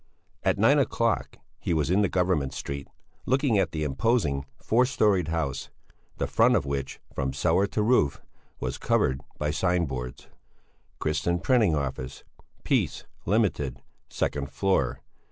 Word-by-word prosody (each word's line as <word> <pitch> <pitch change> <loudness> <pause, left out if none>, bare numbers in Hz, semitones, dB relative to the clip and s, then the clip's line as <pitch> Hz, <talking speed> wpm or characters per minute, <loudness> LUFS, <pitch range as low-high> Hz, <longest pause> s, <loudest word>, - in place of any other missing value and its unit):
At - - +1
nine - - +5
o'clock - - 0 0.2
he 85 - -1
was 75 +1 +1
in 100 +3 +4
Government 90 -8 +1
Street, 70 0 -5 0.4
looking 130 -5 +3
at 90 -5 +1
the 75 -1 -2
imposing 70 - +1
four 125 +3 +3
storied 105 - +2
house, 80 -5 -2 0.5
the - - 0
front - - +4
of - - +1
which, 70 -1 -3
from 65 -1 -2
cellar 100 +2 +2
to 105 - -1
roof, 105 - +3 0.4
was - - -3
covered 65 +1 +1 0.2
by 75 0 -1
sign 90 +2 +1
boards: 65 -3 -6 0.7
"Christian 80 +3 0
Printing 110 -7 +3
office, 65 -3 -4 0.4
Peace, - - 0 0.2
Ltd., 90 - +1 0.3
second 70 -1 -2
floor. 70 -4 0
80 Hz, 135 wpm, -27 LUFS, 70-100 Hz, 0.7 s, nine